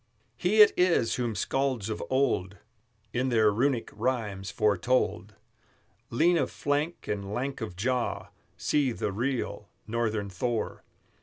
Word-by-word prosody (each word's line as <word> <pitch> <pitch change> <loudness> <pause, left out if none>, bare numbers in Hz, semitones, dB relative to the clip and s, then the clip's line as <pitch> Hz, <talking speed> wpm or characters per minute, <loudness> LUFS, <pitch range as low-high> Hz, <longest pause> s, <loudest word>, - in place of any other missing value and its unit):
He 190 - +4
it - - +4
is 175 -11 +3
whom 120 -3 -1
Skalds 130 0 0
of 110 -1 -4
old 100 -8 +1 0.6
In 130 +2 0
their 110 -3 +4
Runic 125 +2 0
rhymes 105 -5 -2
foretold; 105 -1 +1 0.7
Lean 165 +8 +3
of 135 - 0
flank 145 +4 -2
and 100 -1 -3
lank 135 +1 -3
of 105 -6 -5
jaw, 105 -2 -1 0.3
See 140 -5 +1
the 105 - -2
real 115 -2 -2 0.2
Northern 110 -2 -1
Thor! 115 +5 -2
120 Hz, 130 wpm, -28 LUFS, 105-135 Hz, 0.7 s, He